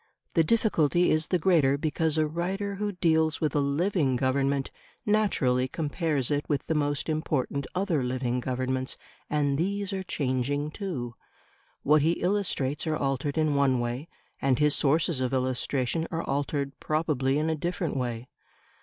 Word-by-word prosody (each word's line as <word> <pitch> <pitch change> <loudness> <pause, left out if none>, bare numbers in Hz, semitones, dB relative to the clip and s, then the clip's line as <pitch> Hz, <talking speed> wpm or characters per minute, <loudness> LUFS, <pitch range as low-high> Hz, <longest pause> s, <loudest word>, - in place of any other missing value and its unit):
The 165 - +4
difficulty 175 -5 +2
is 155 +1 +2
the 180 - +2
greater 155 -6 +3
because 155 +1 0
a 155 - +3
writer 190 +5 -3
who 205 0 -2
deals 160 -3 +2
with 155 -3 0
a - - +4
living 145 0 +1
Government 135 +2 0 0.3
naturally 150 -13 +2
compares 150 -2 -1
it 145 0 +1
with 145 -2 0
the - - 0
most 145 -2 0
important 150 -3 -1
other 180 -6 +1
living 125 0 -1
Governments, 130 +1 -2 0.3
and 145 -1 +1
these 200 +3 -1
are 190 - -2
changing 145 -2 -1
too; 155 - -4 0.7
what 150 +1 +5
he 160 +3 +3
illustrates 175 -7 -1
are 155 -1 +1
altered 135 +1 -1
in 155 -2 +2
one 140 -3 +3
way, 120 +6 -3 0.3
and 135 -2 +2
his 150 0 +3
sources 155 0 +2
of 130 0 -1
illustration 130 +4 0
are 165 0 -3
altered 140 0 -1
probably 150 -4 0
in 155 +1 0
a 160 - +1
different 170 0 -2
way. 120 -2 -3
150 Hz, 155 wpm, -27 LUFS, 135-165 Hz, 0.7 s, what